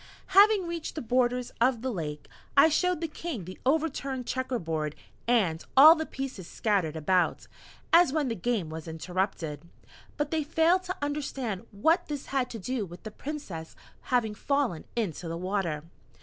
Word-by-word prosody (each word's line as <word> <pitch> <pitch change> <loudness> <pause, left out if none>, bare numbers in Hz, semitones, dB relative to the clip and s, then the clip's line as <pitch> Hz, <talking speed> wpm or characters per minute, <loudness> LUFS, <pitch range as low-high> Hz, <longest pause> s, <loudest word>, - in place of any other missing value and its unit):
Having 400 0 +7
reached 335 -2 -4
the 310 - -3
borders 250 +1 +1
of 245 -1 +3
the 260 - -1
lake, 150 -7 -5 0.3
I 295 +3 +8
showed 360 +2 +1
the 330 - -1
King 305 - -5
the 185 +1 -9
overturned 275 -4 0
checker 260 0 -2
board, 160 -5 -3 0.3
and 195 -10 +2
all 305 +4 +11
the 315 -1 -3
pieces 260 -10 -6
scattered 190 -9 0
about, 175 +3 +1 0.5
as 335 -4 +7
when 300 -2 0
the 235 - -1
game 205 -5 -1
was 160 +1 -7
interrupted. 165 -1 -3 0.6
But 295 0 -1
they 320 -2 +1
failed 330 +4 +3
to 370 +1 -4
understand 270 -8 -3
what 320 - +2
this 290 -2 -4
had 260 -2 +1
to 230 - -6
do 235 +3 -2
with 175 -2 -10
the 215 - -6
Princess 210 - -7 0.3
having 240 -4 +2
fallen 265 - -1
into 180 -7 -2
the 165 0 -3
water. 180 -4 -2
245 Hz, 165 wpm, -28 LUFS, 180-295 Hz, 0.6 s, all